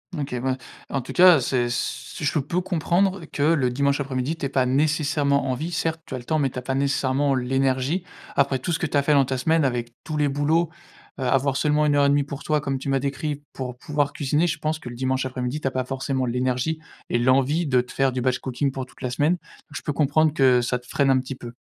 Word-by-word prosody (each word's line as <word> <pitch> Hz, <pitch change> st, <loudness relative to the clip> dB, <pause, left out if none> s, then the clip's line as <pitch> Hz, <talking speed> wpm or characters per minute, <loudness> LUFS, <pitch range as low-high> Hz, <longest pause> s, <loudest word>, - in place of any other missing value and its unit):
OK, 140 Hz, -4 st, -3 dB
ben, 130 Hz, +1 st, 0 dB, 0.3 s
en 135 Hz, -, -1 dB
tout -, -, -8 dB
cas, 180 Hz, -5 st, +7 dB
c'est 120 Hz, -1 st, 0 dB
ce 120 Hz, +5 st, -4 dB
je 150 Hz, +1 st, +1 dB
peux 170 Hz, +6 st, -1 dB
comprendre 180 Hz, +1 st, 0 dB
que 145 Hz, -2 st, -3 dB
le 150 Hz, -5 st, +3 dB
dimanche 140 Hz, +3 st, +1 dB
après-midi, 135 Hz, +3 st, -2 dB
tu -, -, -3 dB
aies 135 Hz, -, -1 dB
pas 130 Hz, -1 st, +2 dB
nécessairement 145 Hz, 0 st, +1 dB
envie. 155 Hz, +7 st, -3 dB
Certes, 165 Hz, -1 st, -1 dB
tu 130 Hz, -, -6 dB
as -, -, -3 dB
le 120 Hz, -, -9 dB
temps 155 Hz, +5 st, 0 dB
mais 135 Hz, -2 st, +2 dB
tu -, -, -10 dB
as 125 Hz, -, -2 dB
pas 135 Hz, +1 st, -2 dB
nécessairement 140 Hz, 0 st, +1 dB
l'énergie. 130 Hz, +6 st, 0 dB, 0.3 s
Après 140 Hz, -1 st, +2 dB
tout 130 Hz, +7 st, -3 dB
ce 165 Hz, -, 0 dB
que -, -, 0 dB
tu -, -, -4 dB
as 140 Hz, -, +3 dB
fait 150 Hz, -, +2 dB
dans 140 Hz, -2 st, +5 dB
ta 130 Hz, 0 st, -2 dB
semaine, 160 Hz, +3 st, +2 dB
avec 120 Hz, -2 st, -2 dB
tous 155 Hz, -, -4 dB
les 150 Hz, -1 st, +2 dB
boulots, 150 Hz, +4 st, +1 dB, 0.5 s
heu, -, -, -2 dB
avoir 135 Hz, +1 st, +2 dB
seulement 150 Hz, 0 st, +2 dB
1 145 Hz, -1 st, +3 dB
heure 145 Hz, 0 st, +4 dB
1/2 145 Hz, 0 st, +3 dB
pour 140 Hz, 0 st, -7 dB
toi, 150 Hz, -2 st, +1 dB
comme 135 Hz, -2 st, -2 dB
tu 135 Hz, -, -7 dB
m'as 135 Hz, -1 st, +2 dB
décrit, 145 Hz, +1 st, -3 dB
pour 125 Hz, -2 st, -6 dB
pouvoir 145 Hz, 0 st, -1 dB
cuisiner, 150 Hz, +4 st, +1 dB
je 150 Hz, -, -1 dB
pense 155 Hz, +1 st, -1 dB
que 125 Hz, -, -11 dB
le 120 Hz, -, -6 dB
dimanche 130 Hz, +1 st, -1 dB
après-midi, 130 Hz, +2 st, -3 dB
tu 135 Hz, -, -2 dB
as -, -, 0 dB
pas 130 Hz, -1 st, -1 dB
forcément 135 Hz, 0 st, -2 dB
l'énergie 125 Hz, +5 st, -1 dB, 0.3 s
et -, -, +1 dB
l'envie 135 Hz, +7 st, +3 dB
de 125 Hz, -2 st, +3 dB
te 125 Hz, -, -12 dB
faire 135 Hz, -1 st, +1 dB
du 125 Hz, -, -2 dB
batch 125 Hz, 0 st, +1 dB
cooking 135 Hz, +2 st, -1 dB
pour 130 Hz, -1 st, -5 dB
toute 130 Hz, -, -20 dB
la 125 Hz, -, -2 dB
semaine. 150 Hz, +7 st, +2 dB
Donc 165 Hz, -4 st, -12 dB
je -, -, -4 dB
peux 150 Hz, -, -2 dB
comprendre 155 Hz, +1 st, +2 dB
que 130 Hz, -4 st, +4 dB
ça 125 Hz, +1 st, -1 dB
te 125 Hz, -, -20 dB
freine 140 Hz, -1 st, +1 dB
un 130 Hz, -, +4 dB
petit 130 Hz, +1 st, -5 dB
peu. 120 Hz, -2 st, -9 dB
140 Hz, 260 wpm, -24 LUFS, 130-150 Hz, 0.5 s, cas